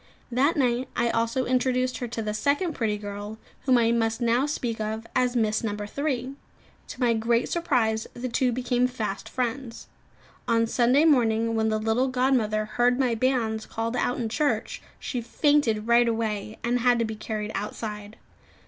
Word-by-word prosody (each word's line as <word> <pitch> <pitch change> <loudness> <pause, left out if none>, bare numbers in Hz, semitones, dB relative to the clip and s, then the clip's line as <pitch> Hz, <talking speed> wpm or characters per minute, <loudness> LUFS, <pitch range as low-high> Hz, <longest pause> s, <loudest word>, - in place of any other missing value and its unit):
That 275 +7 +2
night 250 -2 +1
I 240 -1 +1
also 230 +3 0
introduced 255 0 +1
her 245 - -3
to 230 -1 -4
the 210 0 -2
second 290 - 0
pretty 215 -5 -1
girl 205 +1 -7 0.3
whom 255 -1 +5
I 230 -1 +3
must 225 -1 0
now 240 +3 +2
speak 240 -6 -3
of 220 +1 -3
as 250 0 +2
Miss 220 -2 +1
No. 210 -2 -2
3. 255 +4 -3 0.5
To - - -9
my 245 -3 +3
great 230 +2 +1
surprise, 225 -10 0
the 245 +1 -4
two 250 +1 +1
became 245 0 +1
fast 215 -6 -4
friends. 250 -1 -4 0.6
On 230 -1 +3
the - - +3
Sunday 255 +5 +4
morning, 230 -6 +3
when 220 0 +1
the 215 - +1
little 225 +4 +1
godmother 250 -5 +1
heard 245 +3 +2
my 255 -3 +2
banns 225 -2 0
called 230 +2 -3
out 245 - 0
in 235 - -2
church, 290 +6 -1 0.2
she 245 - -4
fainted 235 -3 +1
right 235 0 +5
away, 220 -2 -2
and 245 +1 +1
had 245 0 +3
to 230 - +1
be 220 - -4
carried 215 0 -4
outside. 210 +1 -5
235 Hz, 175 wpm, -26 LUFS, 220-255 Hz, 0.6 s, whom